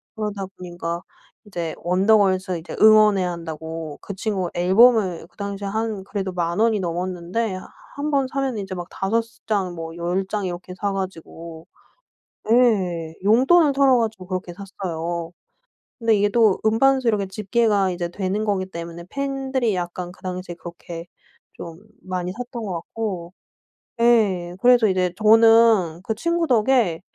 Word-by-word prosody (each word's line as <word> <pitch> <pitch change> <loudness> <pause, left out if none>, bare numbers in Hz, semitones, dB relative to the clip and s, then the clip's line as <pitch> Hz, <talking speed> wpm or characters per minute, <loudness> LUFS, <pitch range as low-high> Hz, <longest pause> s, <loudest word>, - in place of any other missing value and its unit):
그러다 210 -2 -3
보니까 175 -1 -5 0.4
이제 170 -5 -4
원더걸스 190 0 +2
이제 160 - -8
응원해야 215 -4 +6
한다고 160 -2 -6
그 200 - -7
친구가 190 -3 -2
앨범을 190 -1 +4
그 - - -35
당시에 200 -1 -4
한 215 -1 -2
그래도 195 -1 -4
10,000 175 +1 -2
원이 225 -1 +3
넘었는데 185 +4 -2 0.4
한번 285 -2 0
사면은 270 -4 -2
이제 190 -1 -6
막 175 -1 -6
5 210 +4 0 0.3
장 195 -5 0
뭐 165 0 -7
10 175 +3 -1
장 205 0 -2
이렇게 180 0 -6
사 200 - 0
가지고 170 -3 -7 0.8
예 185 -9 +2
용돈을 270 - +5
털어 270 -2 +4
가지고 220 -5 -3
그렇게 185 -1 -4
샀어요. 170 -3 -5 0.7
근데 230 -2 +2
이게 205 0 +3
또 215 -2 +3
음반 265 +5 +4
수 245 - -1
이렇게 205 -3 +1
집계가 205 0 +1
이제 175 -1 -3
되는 195 +4 -2
거기 200 -3 -1
때문에 170 -1 -8
팬들이 270 -4 -1
약간 175 0 -4
그 - - -22
당시에 185 -1 -5
그렇게 170 0 -9 0.5
좀 165 -1 -9 0.2
많이 180 -1 -3
샀던 245 +2 -7
거 195 - -4
같고 175 0 -5 0.7
예 200 -7 +3
그래서 245 -2 +5
이제 185 -2 0
저는 220 -6 +5
그 220 - -2
친구 335 +7 0
덕에 235 - +2
195 Hz, 290 characters per minute, -22 LUFS, 175-225 Hz, 0.8 s, 응원해야